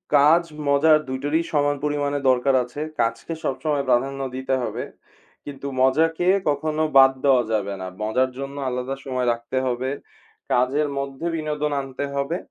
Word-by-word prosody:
কাজ, 155 Hz, +4 st, +6 dB, 0.3 s
মজা 140 Hz, +3 st, +4 dB, 0.2 s
২ 130 Hz, 0 st, -3 dB
টারই 155 Hz, +3 st, +1 dB
সমান 145 Hz, -1 st, +2 dB
পরিমাণে 145 Hz, -1 st, 0 dB
দরকার 130 Hz, +1 st, +3 dB
আছে। 125 Hz, +4 st, -9 dB, 0.2 s
কাজকে 115 Hz, +7 st, -2 dB
সবসময় 145 Hz, +1 st, -1 dB
প্রাধান্য 135 Hz, +3 st, +1 dB
দিতে 130 Hz, 0 st, -1 dB
হবে। -, -, -3 dB, 0.6 s
কিন্তু 140 Hz, -1 st, -7 dB
মজাকে 160 Hz, +6 st, +2 dB, 0.2 s
কখনো 155 Hz, +2 st, -1 dB, 0.2 s
বাদ 135 Hz, 0 st, +8 dB
দেওয়া 130 Hz, -3 st, +5 dB
যাবে 100 Hz, -2 st, -1 dB
না। 95 Hz, -, -4 dB, 0.2 s
মজার 130 Hz, +4 st, +1 dB
জন্য 140 Hz, 0 st, -5 dB
আলাদা 125 Hz, +2 st, -3 dB
সময় 130 Hz, -2 st, -1 dB
রাখতে 120 Hz, +2 st, -5 dB
হবে। 125 Hz, +1 st, -1 dB, 0.6 s
কাজের 135 Hz, +4 st, +2 dB
মধ্যে 140 Hz, +3 st, -4 dB
বিনোদন 150 Hz, -1 st, -2 dB
আনতে 135 Hz, +1 st, -5 dB
হবে 140 Hz, +5 st, -1 dB
135 Hz, 150 wpm, -23 LUFS, 130-145 Hz, 0.6 s, বাদ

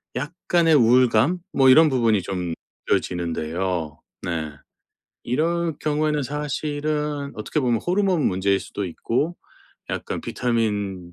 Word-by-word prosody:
약간의 165 Hz, +3 st, +1 dB
우울감? 125 Hz, +4 st, +4 dB, 0.2 s
뭐 135 Hz, -1 st, +5 dB
이런 155 Hz, +4 st, +7 dB
부분이 115 Hz, -7 st, +2 dB
좀 90 Hz, -3 st, -3 dB, 0.4 s
느껴지는데요. 85 Hz, -1 st, -1 dB, 0.2 s
네. 80 Hz, -4 st, -3 dB, 0.7 s
이럴 165 Hz, +4 st, 0 dB
경우에는 150 Hz, 0 st, 0 dB
사실은 150 Hz, 0 st, -3 dB
어떻게 110 Hz, +8 st, -2 dB
보면 120 Hz, -4 st, +1 dB
호르몬 185 Hz, -3 st, +2 dB
문제일 95 Hz, +1 st, +1 dB
수도 100 Hz, -, -5 dB
있고 130 Hz, -, -2 dB, 0.5 s
약간 -, -, -4 dB
비타민 105 Hz, -7 st, -2 dB
125 Hz, 265 characters per minute, -23 LUFS, 95-150 Hz, 0.7 s, 이런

